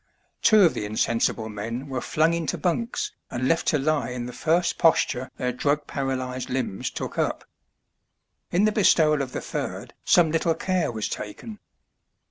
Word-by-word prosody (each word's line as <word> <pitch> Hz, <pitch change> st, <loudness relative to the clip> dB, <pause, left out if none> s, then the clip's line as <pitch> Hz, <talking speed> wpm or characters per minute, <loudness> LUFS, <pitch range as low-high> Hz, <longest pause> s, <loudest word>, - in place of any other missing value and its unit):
Two 215 Hz, -3 st, +6 dB
of 170 Hz, -, +5 dB
the -, -, -3 dB
insen 110 Hz, +2 st, 0 dB
sible 110 Hz, -2 st, -1 dB
men 115 Hz, +6 st, -5 dB
were 130 Hz, -2 st, -3 dB
flung 160 Hz, +2 st, +2 dB
into 165 Hz, -3 st, -1 dB
bunks 230 Hz, +7 st, -1 dB, 0.2 s
and 130 Hz, +1 st, -2 dB
left 165 Hz, +3 st, +1 dB
to 155 Hz, -, +3 dB
lie 145 Hz, -1 st, 0 dB
in 125 Hz, -1 st, -4 dB
the 125 Hz, -, -7 dB
first 170 Hz, +5 st, +1 dB
posture 140 Hz, -5 st, +2 dB
their 125 Hz, 0 st, -1 dB
drug 145 Hz, +4 st, 0 dB
paralyzed 130 Hz, -2 st, -3 dB
limbs 125 Hz, -7 st, -2 dB
took -, -, -5 dB
up. -, -, -1 dB, 1.1 s
In 185 Hz, +4 st, +3 dB
the 215 Hz, -, +3 dB
bestowal 155 Hz, -8 st, +4 dB
of 130 Hz, -2 st, -4 dB
the -, -, -4 dB
third -, -, -5 dB
some 165 Hz, -3 st, +4 dB
little 165 Hz, 0 st, +1 dB
care 185 Hz, -7 st, 0 dB
was 110 Hz, -2 st, -3 dB
taken. 210 Hz, -, -7 dB
145 Hz, 170 wpm, -25 LUFS, 125-170 Hz, 1.1 s, Two